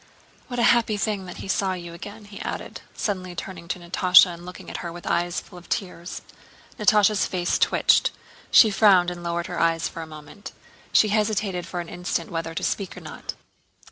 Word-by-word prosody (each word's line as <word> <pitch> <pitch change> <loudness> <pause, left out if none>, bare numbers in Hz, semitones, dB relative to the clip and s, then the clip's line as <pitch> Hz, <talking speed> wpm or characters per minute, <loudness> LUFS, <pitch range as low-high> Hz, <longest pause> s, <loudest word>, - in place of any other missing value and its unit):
What 245 - -5
a 235 - +2
happy 225 -3 +1
thing 205 -3 -2
that - - -8
he - - -7
saw 190 0 +1
you 175 -2 -7
again," 205 +5 -9
he 205 0 -10
added, - - -5
suddenly 185 -4 -3
turning 175 0 -7
to 165 - -2
Natásha 180 +1 +5
and 170 +1 -11
looking 180 - -10
at - - -5
her 170 - -5
with 175 +1 -10
eyes 175 +1 0
full 180 - -13
of 175 - -18
tears. 180 -4 -4 0.6
Natásha's 210 -1 +4
face 180 -1 0
twitched. - - +4 0.4
She 220 - +7
frowned 190 -4 +5
and 175 -1 -7
lowered 170 0 -2
her 180 -2 -4
eyes 165 0 +2
for 165 - -7
a 160 - -7
moment. 155 +6 -11 0.4
She 215 - +5
hesitated 205 -4 0
for 175 - -3
an 170 - -9
instant 175 -1 -3
whether 165 -1 -4
to - - -3
speak 195 -2 -2
or - - -8
not. - - -7
180 Hz, 200 wpm, -24 LUFS, 170-205 Hz, 0.6 s, She